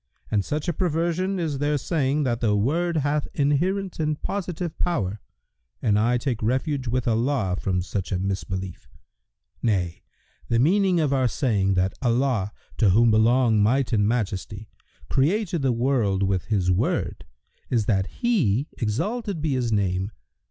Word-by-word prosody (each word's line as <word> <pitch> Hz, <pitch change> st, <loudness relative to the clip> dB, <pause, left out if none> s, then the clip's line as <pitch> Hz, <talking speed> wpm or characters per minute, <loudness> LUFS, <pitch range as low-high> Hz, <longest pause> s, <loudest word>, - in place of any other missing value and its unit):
And 105 Hz, -2 st, +2 dB
such 150 Hz, -, -3 dB
a 175 Hz, -, +1 dB
perversion 175 Hz, +3 st, 0 dB
is 155 Hz, -6 st, -2 dB
their 145 Hz, +1 st, +1 dB
saying 145 Hz, 0 st, 0 dB
that 120 Hz, -3 st, -1 dB
the 105 Hz, -3 st, +2 dB
Word 165 Hz, +11 st, +1 dB
hath 145 Hz, 0 st, 0 dB
inherent 175 Hz, +7 st, 0 dB
and 155 Hz, -1 st, -1 dB
positive 180 Hz, -4 st, -4 dB
power 105 Hz, -, -1 dB, 0.6 s
and 105 Hz, -1 st, +2 dB
I 120 Hz, +3 st, +2 dB
take 120 Hz, -3 st, -2 dB
refuge 130 Hz, +4 st, -1 dB
with 125 Hz, +1 st, -1 dB
Allah 115 Hz, -4 st, +1 dB
from 90 Hz, -2 st, 0 dB
such 95 Hz, 0 st, -4 dB
a 95 Hz, -, +1 dB
mis 95 Hz, +1 st, -2 dB
belief! 95 Hz, -2 st, -6 dB, 0.7 s
Nay, 90 Hz, -7 st, 0 dB, 0.5 s
the 115 Hz, -, +2 dB
meaning 180 Hz, -, +3 dB
of 150 Hz, -3 st, +1 dB
our 130 Hz, -2 st, +2 dB
saying 100 Hz, -7 st, +1 dB
that 95 Hz, +1 st, +1 dB
Allah 120 Hz, -5 st, +1 dB, 0.3 s
(to 110 Hz, -, +5 dB
whom 115 Hz, +5 st, +5 dB
belong 110 Hz, 0 st, +4 dB
Might 125 Hz, +4 st, +2 dB
and 105 Hz, -2 st, +3 dB
Majesty!) 105 Hz, -1 st, -3 dB, 0.4 s
created 170 Hz, +4 st, +1 dB
the 135 Hz, -2 st, +2 dB
world 115 Hz, -6 st, +1 dB
with 95 Hz, -2 st, 0 dB
His 95 Hz, -4 st, +1 dB
Word 90 Hz, -, -1 dB, 0.5 s
is 115 Hz, -4 st, +1 dB
that 95 Hz, -3 st, +1 dB
He 150 Hz, -, 0 dB
(exalted 190 Hz, -, -2 dB
be 150 Hz, -2 st, 0 dB
His 125 Hz, -3 st, 0 dB
name!) 95 Hz, -2 st, 0 dB
125 Hz, 155 wpm, -24 LUFS, 105-150 Hz, 0.7 s, to